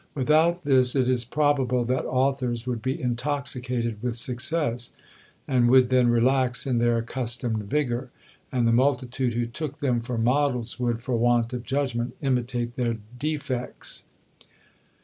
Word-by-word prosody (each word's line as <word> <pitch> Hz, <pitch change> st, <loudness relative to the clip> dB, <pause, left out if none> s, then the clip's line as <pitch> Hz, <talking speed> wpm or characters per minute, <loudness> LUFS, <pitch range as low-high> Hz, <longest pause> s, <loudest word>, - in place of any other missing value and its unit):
Without 155 Hz, +6 st, +3 dB
this 130 Hz, -3 st, +3 dB
it 130 Hz, -2 st, +2 dB
is 125 Hz, -2 st, +2 dB
probable 130 Hz, -2 st, +1 dB
that 130 Hz, +2 st, -1 dB
authors 130 Hz, -2 st, 0 dB
would 120 Hz, -3 st, -3 dB
be 130 Hz, +2 st, -2 dB
intoxicated 125 Hz, -3 st, -2 dB
with 120 Hz, -1 st, -2 dB
success, 125 Hz, 0 st, 0 dB, 0.5 s
and 125 Hz, -2 st, +3 dB
would 130 Hz, 0 st, +5 dB
then 125 Hz, -1 st, +4 dB
relax 125 Hz, +1 st, +2 dB
in 125 Hz, -3 st, +1 dB
their 120 Hz, 0 st, +2 dB
accustomed 115 Hz, -2 st, -1 dB
vigour; 130 Hz, -3 st, -1 dB, 0.4 s
and 125 Hz, -2 st, +1 dB
the -, -, +3 dB
multitude 125 Hz, 0 st, +1 dB
who 120 Hz, 0 st, 0 dB
took 140 Hz, +5 st, -6 dB
them 125 Hz, -4 st, 0 dB
for 120 Hz, 0 st, -4 dB
models 125 Hz, 0 st, 0 dB
would, 120 Hz, -1 st, -1 dB
for 125 Hz, -1 st, -1 dB
want 120 Hz, +1 st, +2 dB
of 125 Hz, -, -3 dB
judgment, 125 Hz, -2 st, -2 dB
imitate 125 Hz, -3 st, -1 dB
their 120 Hz, -2 st, 0 dB, 0.2 s
defects. 140 Hz, -4 st, -3 dB
125 Hz, 145 wpm, -25 LUFS, 120-135 Hz, 0.5 s, would